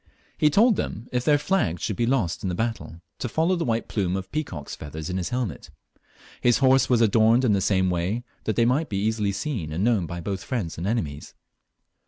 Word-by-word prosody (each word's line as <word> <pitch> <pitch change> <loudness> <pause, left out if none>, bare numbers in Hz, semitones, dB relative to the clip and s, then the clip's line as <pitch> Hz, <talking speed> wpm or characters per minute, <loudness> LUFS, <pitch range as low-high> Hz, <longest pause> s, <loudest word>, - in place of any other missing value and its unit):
He 150 - +3
told 215 - +4
them, 110 +4 -4
if 125 -1 0
their 145 +2 +4
flags 140 - 0
should 105 - -1
be 120 +2 0
lost 115 -10 0
in 95 - -2
the 90 - -2
battle, 110 -6 -3 0.2
to 120 - -3
follow 165 +8 +1
the 170 - -2
white 115 -1 -1
plume 95 -4 -1
of 95 0 -7
peacock's 95 - -4
feathers 80 +3 -6
in 90 - -2
his 90 - -2
helmet 120 - -3 0.7
His 120 -1 +4
horse 135 0 +4
was 120 -2 +3
adorned 115 +3 +4
in 110 - +3
the 100 - +1
same 95 -2 +2
way, 90 +7 -1 0.2
that 110 - 0
they 115 - +3
might 140 +7 +1
be 100 +1 0
easUy 105 -2 0
seen 100 - -3
and 85 +5 -1
known 110 -7 +2
by 85 +2 -5
*both 95 +2 -4
friends 105 -11 -3
and 90 - -3
enemies. 80 -11 -3
110 Hz, 220 wpm, -25 LUFS, 90-125 Hz, 0.7 s, told